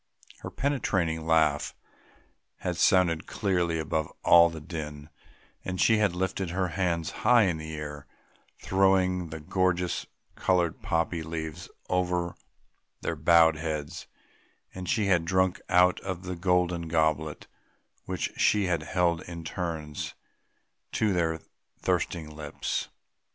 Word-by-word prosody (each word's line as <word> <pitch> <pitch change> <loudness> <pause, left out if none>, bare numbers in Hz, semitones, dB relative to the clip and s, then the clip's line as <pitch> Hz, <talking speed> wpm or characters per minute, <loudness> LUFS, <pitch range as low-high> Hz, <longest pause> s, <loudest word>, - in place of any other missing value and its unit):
Her - - -6
penetrating 95 - -1
laugh 80 -3 +2 0.9
had 90 -1 -2
sounded 85 -2 +3
clearly 90 -5 0
above 80 0 -2
all 85 0 +7
the 80 -1 -7
din, 75 -2 -7 0.5
and 90 -1 -4
she 110 - +5
had 100 -4 +2
lifted 95 0 -2
her 90 +1 -1
hands 85 -4 -1
high 120 -2 +6
in 90 -5 +1
the 80 0 -6
air 75 -2 -7 0.6
throwing 95 -2 +2
the 80 +1 -6
gorgeous 90 +1 0 0.3
coloured 90 -3 +1
poppy 85 0 0
leaves 80 +1 -5 0.2
over 90 -1 0 0.7
their - - -2
bowed 80 -2 +5
heads; 75 -2 -4 0.7
and 90 -1 -6
she 110 -4 +2
had 90 -4 +3
drunk 95 +2 +1
out 90 -1 +4
of 95 -1 -5
a 90 - -3
golden 90 -1 +1
goblet 80 -1 0 0.6
which 90 -3 -2
she 105 -2 +3
had 85 -3 0
held 85 +1 +1
in 85 -1 -7
turns 80 -3 -4 0.8
to 110 -3 +2
their 80 -2 0 0.4
thirsting 85 -3 -1
lips. 75 -2 -3
85 Hz, 125 wpm, -28 LUFS, 80-90 Hz, 0.9 s, all